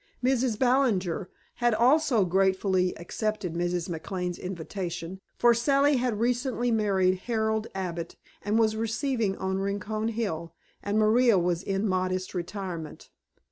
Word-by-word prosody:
Mrs. 255 -3 +1
Ballinger 230 -9 +1 0.3
had 240 -2 +2
also 250 -2 +4
gratefully 190 0 +1
accepted 205 +1 -3
Mrs. 175 0 -1
McLane's 180 +1 -4
invitation, 180 0 -5 0.2
for 240 0 +5
Sally 275 +4 +3
had 245 -4 -1
recently 245 +1 0
married 190 -4 +2
Harold 220 -1 0
Abbott 175 -3 -4 0.3
and 210 +2 0
was 220 -1 +3
receiving 225 -2 -1
on 190 0 -2
Rincon 205 +2 -2
Hill, 170 -8 -3 0.3
and 205 +1 -1
Maria 220 +1 +4
was 175 -1 +1
in 195 +2 -1
modest 185 0 -1
retirement. 180 -3 -6
200 Hz, 125 wpm, -27 LUFS, 185-230 Hz, 0.3 s, for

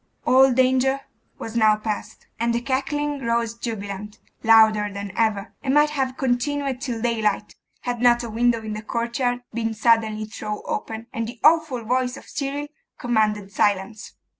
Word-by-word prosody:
All 265 +1 +6
danger 260 +2 +2 0.4
was 225 0 -7
now 215 -2 +5
past; 215 0 -5
and 235 0 +1
the 235 - 0
cackling 275 +2 -2
rose 230 -1 0
jubilant, 210 -3 -6 0.2
louder 220 -2 +5
than 200 0 -6
ever, 220 -2 0
and 270 0 0
might 295 0 +5
have 265 -3 -2
continued 265 +1 -1
till 235 -4 -3
daylight, 215 -3 0 0.3
had 245 -1 -3
not 240 -1 +4
a 235 - -5
window 230 0 +1
in 215 -1 -4
the 215 - -5
courtyard 240 +2 -2
been 225 -1 -2
suddenly 220 -1 +2
thrown 210 -1 -6
open, 225 0 -4
and 230 0 -2
the 240 0 -9
awful 305 -7 +3
voice 250 +2 0
of - - -12
Cyril 285 +1 -3 0.3
commanded 210 -4 0
silence. 205 +1 -1
235 Hz, 160 wpm, -23 LUFS, 215-255 Hz, 0.4 s, All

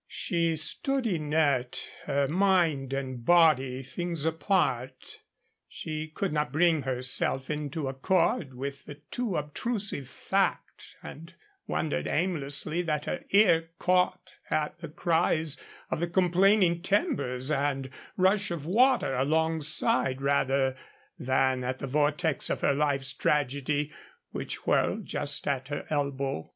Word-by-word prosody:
She 170 -4 -1
stood 255 - -1
inert, 150 - 0 0.2
her 140 0 +1
mind 165 -6 +2
and 130 -3 -4
body 135 -5 +4
things 165 +3 -4
apart. 145 - -1 0.5
She 155 0 -5
could 165 +3 -3
not 150 -3 0
bring 160 +1 +3
herself 130 +1 -1
into 150 0 -3
accord 135 0 0
with 140 +2 -6
the 145 - -8
too 195 +8 -3
obtrusive 150 - -3
fact, - - -2
and 165 +3 -10 0.4
wondered 155 - -1
aimlessly 155 -1 0
that 150 -3 -2
her - - -3
ear 175 -5 +4
caught 180 0 0
at 155 +1 -1
the 165 -2 -7
cries 160 -2 0 0.3
of - - -1
the 170 - 0
complaining 180 0 +3
timbers 180 - 0
and 135 -2 -1 0.3
rush 195 +3 +3
of 170 -4 -4
water 240 - +3
alongside, 150 -2 +1
rather 135 -1 +1 0.4
than 130 0 +1
at 130 +1 -2
the - - -5
vortex 150 +2 +1
of - - -2
her - - +3
life's 140 -2 0
tragedy 145 +1 0 0.4
which - - -5
whirled - - +1
just 145 0 -2
at 135 -2 -1
her 145 0 -4
elbow. 140 - -2
150 Hz, 125 wpm, -28 LUFS, 135-170 Hz, 0.5 s, body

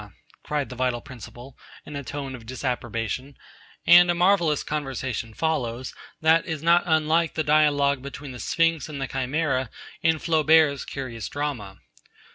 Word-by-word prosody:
cried 150 -2 -2
the 125 - -8
Vital 125 -1 0
Principle, 125 +1 -11 0.3
in 150 - -9
a 140 - -4
tone 135 +2 -5
of 115 -3 -10
disapprobation, 125 +1 -4 0.5
and 175 +1 +8
a 175 - +2
marvellous 175 -4 +3
conversation 130 -6 -4
follows, 125 -3 -2 0.3
that 160 +1 +4
is 160 -3 -4
not 170 +1 +5
unlike 160 0 +2
the 155 - 0
dialogue 145 -3 +3
between 140 +1 -8
the 125 - -9
Sphinx 165 -3 +1
and 145 -2 -6
the 135 - -1
Chimera 135 -1 -1 0.3
in 160 -1 +3
Flaubert's 155 -3 +3
curious 125 -5 -6
drama. 135 -10 -4
140 Hz, 145 wpm, -25 LUFS, 130-160 Hz, 0.5 s, and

